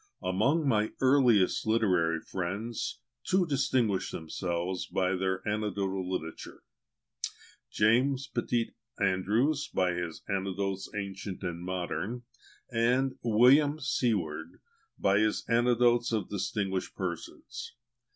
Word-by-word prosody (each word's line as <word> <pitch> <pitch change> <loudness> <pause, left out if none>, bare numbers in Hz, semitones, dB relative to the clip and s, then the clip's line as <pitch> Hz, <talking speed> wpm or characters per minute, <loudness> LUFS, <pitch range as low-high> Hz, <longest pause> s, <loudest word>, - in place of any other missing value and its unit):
Among 130 - +2
my 110 -4 +2
earliest 125 -9 +4
literary 90 -8 +2
friends, 100 +6 -4 0.2
two 185 -1 +2
distinguished 130 - +1
themselves 85 +2 -3
by 95 0 0
their 95 0 -1
anecdotical 100 -3 -1
literature: 80 -3 -5 1.1
JAMES 125 +6 +3
PETIT 120 -1 0 0.3
ANDREWS, 105 +10 +1
by 90 -1 +1
his 85 -2 -4
"Anecdotes, 95 0 -2
Ancient 100 -1 -5
and 85 -2 -3
Modern," 95 +6 -3 0.5
and 125 +3 +2
WILLIAM 130 +7 +5
SEWARD, 90 - -1 0.4
by 100 +1 +3
his 110 0 +1
"Anecdotes 120 0 +3
of 110 -2 -1
Distinguished 95 -1 -2
Persons." 90 -4 -6
105 Hz, 100 wpm, -30 LUFS, 95-120 Hz, 1.1 s, WILLIAM